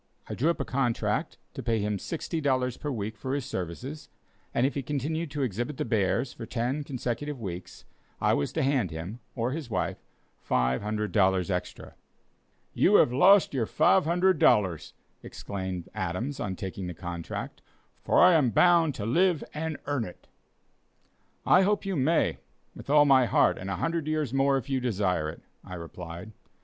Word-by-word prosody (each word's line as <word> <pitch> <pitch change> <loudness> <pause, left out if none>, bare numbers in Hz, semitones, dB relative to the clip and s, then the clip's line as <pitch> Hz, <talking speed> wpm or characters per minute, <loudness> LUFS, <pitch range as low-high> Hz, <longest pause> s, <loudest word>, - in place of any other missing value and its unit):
I - - -5
drew 150 +7 +1
up 170 - 0
a - - -2
contract 130 -3 -1 0.2
to - - -6
pay 115 -1 0
him 105 -1 -1
$60 135 - -1
per 150 - -4
week 110 -4 -4
for 130 +6 -3
his 140 -4 -3
services, 125 - -6 0.4
and 120 - +1
if 140 - 0
he 140 - -2
continued 150 +4 -2
to 140 0 -2
exhibit 120 +5 -3
the - - -2
bears 115 +3 0
for 115 - -8
ten 125 +5 -2
consecutive 135 +1 -4
weeks 90 -4 -7 0.3
I - - +2
was 70 - 0
then 160 - -1
to 135 - +2
hand 125 -10 +1
him, 85 +8 -7 0.2
or 120 0 -1
his 145 -3 -5
wife, - - -2 0.5
$500 95 - +1
extra. 90 -1 -4 0.8
"You - - +4
have 120 - +5
lost 185 +8 +5
your 120 -5 0
$500!" 160 - +3 0.3
exclaimed 90 +5 -6
Adams 110 +11 -3
on 95 -2 -3
taking 95 0 -5
the 90 - -6
contract; 85 -1 -6 0.4
"for - - +3
I 180 0 +7
am 150 -7 +4
bound 165 - +4
to 100 - -4
live 175 - +2
and 160 0 -3
earn 145 -5 -1
it." 90 - -10 1.2
"I 185 - +6
hope 205 +1 +1
you 195 -1 -1
may, 155 +4 +1 0.4
with - - -11
all 145 0 +6
my 130 -3 +5
heart, - - +3
and 95 - -6
a 95 - -1
hundred 165 - -2
years 155 -5 -1
more 135 0 +3
if 130 - -5
you 135 -2 0
desire 95 -10 0
it," - - -10 0.2
I 90 - -8
replied. 85 +3 -8
125 Hz, 170 wpm, -28 LUFS, 95-145 Hz, 1.2 s, I